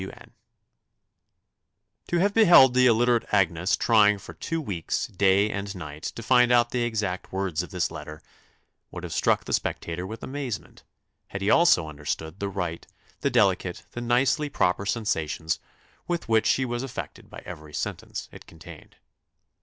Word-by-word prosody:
"W. 95 - -8
N." - - -17 1.8
To 175 - 0
have 200 +4 +2
beheld 175 - +7
the 125 0 +5
illiterate 120 0 +2
Agnes 90 -3 +2
trying 105 -3 +4
for 100 - -11
two 165 - -3
weeks, 100 - -3
day 100 +2 +2
and 100 0 -4
night, 75 -4 -8
to 115 - -7
find 125 +1 +4
out 120 -1 +4
the 125 - -1
exact 105 -6 -2
words 95 -4 -1
of 90 - -8
this 90 -3 -1
letter, 75 0 -8 0.7
would - - -8
have - - -5
struck - - +1
the - - -4
spectator 85 +2 -2
with 110 +3 -8
amazement, 135 -5 -6 0.4
had 100 0 -6
he 100 - +2
also 125 - +5
understood 75 +3 -5
the 100 - -2
right, 90 -4 -4 0.3
the - - 0
delicate, - - +1
the 120 - -6
nicely 130 +5 +1
proper 100 -7 0
sensations 80 -8 -1 0.5
with 175 -4 -2
which 110 -1 +3
she 130 - +2
was 120 -1 -3
affected 135 -2 -7
by - - -11
every 75 0 -9
sentence 70 - -5
it - - -13
contained. - - -14
105 Hz, 160 wpm, -26 LUFS, 90-125 Hz, 1.8 s, beheld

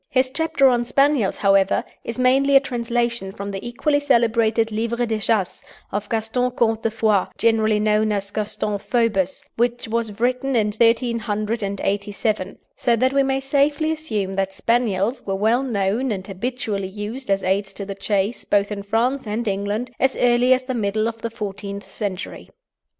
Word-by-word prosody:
His 255 0 +2
chapter 305 -2 +2
on 240 -2 +3
Spaniels, 275 -3 +2
however, 195 -1 +3 0.2
is 230 - -5
mainly 270 +2 +3
a - - +10
translation 235 -5 -2
from 200 +1 -6
the 195 -1 -6
equally 285 +5 0
celebrated 230 -4 +2
"Livre 235 +2 -1
de 220 -2 -1
Chasse," 205 -3 0 0.3
of 205 +1 -3
Gaston 230 +3 0
Comte 225 -3 0
de 225 - +1
Foix, 215 -3 +1
generally 220 -2 +2
known 215 0 +2
as 200 -1 -2
Gaston 210 -1 -2
Phoebus, 210 -6 0
which 240 0 0
was 225 -2 -2
written 255 +2 0
in 215 -2 +2
1387, 215 -3 0 0.2
so 235 - +2
that 255 +3 +1
we 275 - +4
may 270 0 +1
safely 285 +3 +1
assume 215 -12 -2
that 195 0 -1
Spaniels 230 0 0
were 195 - 0
well 220 +5 +2
known, 230 0 0
and 190 -3 -3
habitually 205 -1 -3
used 210 +6 -6
as 195 0 +1
aids 195 +1 0
to 200 - -6
the 195 - -5
chase 200 +2 -1
both 200 0 +1
in 205 -1 -3
France 230 +5 0
and 220 +2 -2
England, 205 +5 -2
as 265 0 +2
early 245 +1 +3
as 255 0 +4
the 260 0 -3
middle 215 -1 0
of 225 0 -5
the 230 - -2
fourteenth 200 -2 -6
century. 195 -3 -5
225 Hz, 165 wpm, -22 LUFS, 200-245 Hz, 0.3 s, a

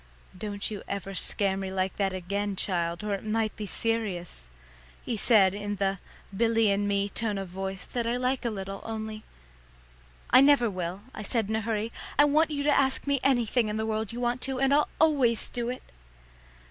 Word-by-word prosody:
"Don't 205 +1 -3
you 205 - -5
ever 195 0 -4
scare 195 0 +1
me 190 -1 -4
like 190 0 -1
that 195 -1 +1
again, 200 +2 -2
child, 170 -1 -1
or 210 -1 -1
it 195 - -3
might 215 0 -1
be 210 -2 -5
serious," 185 - -2 0.6
he 235 - -1
said 205 -3 +5
in 205 0 -3
the 195 -1 -1 0.4
Billy 225 0 +3
and 200 +1 +1
me 200 0 +1
tone 210 0 -1
of 195 -2 -5
voice 190 +1 -5
that 235 -2 -3
I 240 +1 +1
like 255 +1 0
a 240 - 0
little, 195 -2 -5
only 220 -1 -5 1.1
"I 255 - +8
never 275 -5 +5
will," 180 +1 -4
I - - -7
said 215 0 -1
in 220 - 0
a 220 - 0
hurry; 220 0 -2 0.3
"I 290 - +7
want 305 +3 +3
you 285 -2 -2
to 295 - +3
ask 265 -1 +2
me 280 -1 +1
anything 240 -3 +2
in 210 - -2
the 220 - -1
world 220 -1 -2
you 235 - -6
want 245 +1 0
to, 265 -1 -2
and 270 +1 +3
I'll 295 +1 +3
always 275 -8 +4
do 240 -1 -3
it." 250 - -5
215 Hz, 200 wpm, -28 LUFS, 195-240 Hz, 1.1 s, I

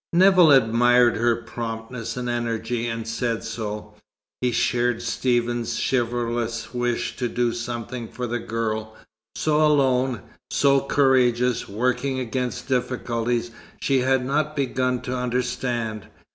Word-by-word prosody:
Nevill 180 -2 +6
admired 120 -1 +5
her 120 +1 +3
promptness 115 +1 -6
and 125 -1 -3
energy, 120 0 -2
and 115 -1 -4
said 115 0 -2
so. 105 -2 -5 0.5
He 125 -1 +1
shared 120 0 +1
Stephen's 120 0 0
chivalrous 120 -2 -1
wish 120 -1 -1
to 125 -2 -1
do 120 0 0
something 120 0 -5
for 125 +3 -5
the 120 +1 -2
girl, 110 -1 -3 0.4
so 155 0 +2
alone, 130 -6 +2 0.3
so 140 -1 +4
courageous, 125 -3 +2
working 125 +5 0
against 125 -3 -3
difficulties 120 -2 -1 0.3
she 135 -2 +2
had 130 0 +2
not 150 +3 0
begun 130 -2 0
to 130 0 -3
understand. 120 -3 -2
120 Hz, 120 wpm, -24 LUFS, 115-130 Hz, 0.5 s, Nevill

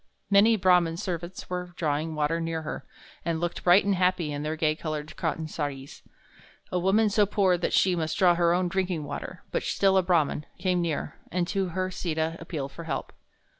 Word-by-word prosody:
Many 210 +3 +6
Brahman 180 -4 +3
servants 175 0 -5
were 180 -1 -4
drawing 155 0 -1
water 155 +2 0
near 165 -1 -2
her, 155 - -6 0.4
and 165 -1 -1
looked 175 0 -3
bright 180 +3 +6
and 200 - +2
happy 180 -4 +1
in 145 0 -3
their 155 +1 -2
gay 155 -1 +1
colored 155 -1 -5
cotton 160 -1 -2
saris. 145 -3 -5 0.7
A 180 - +1
woman 195 +5 +3
so 210 -1 +3
poor 195 -3 +3
that - - -1
she 185 -2 +3
must 160 -2 -2
draw 180 -2 +5
her 170 0 +3
own 180 +1 +2
drinking 180 -3 -1
water, 145 - -7
but - - 0
still 195 -1 +2
a - - +6
Brahman, 165 -4 +1
came 180 -1 +1
near, 165 -3 -3
and 175 -1 0
to 195 -2 0
her 185 0 0
Sita 160 -2 -2
appealed 155 -5 -5
for 170 - -9
help. 135 -4 -4
175 Hz, 195 wpm, -27 LUFS, 160-185 Hz, 0.7 s, Many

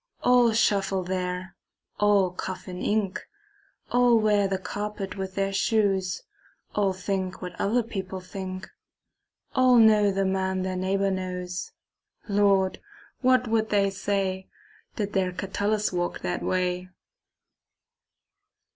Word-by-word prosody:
All 245 -2 +5
shuffle 195 -4 +1
there, 180 0 -3 0.4
all 205 -3 +4
cough 185 +1 -6
in 180 0 -6
ink; 205 -3 0 0.7
All 245 -1 +5
wear 210 -2 +3
the 190 0 -1
carpet 205 0 -5
with 190 -1 -5
their 195 0 0
shoes; 195 -3 +1 0.5
All 200 -2 +2
think 185 0 -3
what 180 -1 -6
other 235 +4 +2
people 190 -4 -5
think; 185 0 -7 0.9
All 255 -2 +5
know 215 -2 +6
the 195 0 0
man 190 0 0
their 185 0 -2
neighbor 195 +2 0
knows. 180 -1 -4 0.5
Lord, 200 -2 +2 0.4
what 255 -1 +3
would 220 0 +1
they 200 -1 +2
say 190 -1 -2 0.5
Did 205 -2 -3
their 185 -2 +1
Catullus 205 +3 -1
walk 175 0 -2
that 175 - -2
way? 180 0 -1
195 Hz, 120 wpm, -26 LUFS, 185-210 Hz, 0.9 s, know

